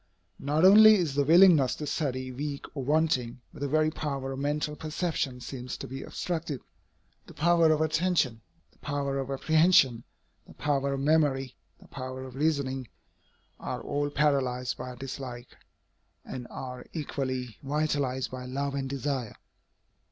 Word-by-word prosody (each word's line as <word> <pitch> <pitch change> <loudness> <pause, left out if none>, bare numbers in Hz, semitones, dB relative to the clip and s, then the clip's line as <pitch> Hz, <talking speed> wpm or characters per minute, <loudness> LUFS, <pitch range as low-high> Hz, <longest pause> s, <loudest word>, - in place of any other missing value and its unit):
Not 150 +5 +2
only 215 +3 +9
is 170 -8 0
the 145 +1 +2
willingness 160 -3 +6
to 150 - -5
study 130 -4 -2
weak 140 +2 -5
or 135 - -3
wanting, 140 -4 +1
but - - -12
the 145 - 0
very 155 +2 +2
power 140 -4 -4
of 135 - -5
mental 150 +1 -1
perception 155 -5 -2
seems 125 0 -6
to - - -7
be 135 +1 -6
obstructed. 160 -6 -4 0.7
The - - -13
power 170 0 +4
of 155 0 +2
attention, 155 -7 +1 0.3
the - - -31
power 140 -1 -2
of 135 0 -4
apprehension, 140 -4 +4 0.4
the - - -15
power 140 -1 0
of 135 - -4
memory, 140 -3 +2 0.2
the - - -17
power 130 0 -6
of 130 -1 -9
reasoning, 135 -3 -1 0.7
are - - -4
all 145 0 -1
paralyzed 135 -4 +1
by 125 0 -7
dislike, 125 -1 -7 0.7
and 125 -2 -7
are 125 -1 -7
equally 130 -7 -4
vitalized 140 -3 -1
by 130 0 -6
love 140 +2 -2
and 135 -1 -3
desire. 135 -4 -3
140 Hz, 150 wpm, -28 LUFS, 130-155 Hz, 0.7 s, only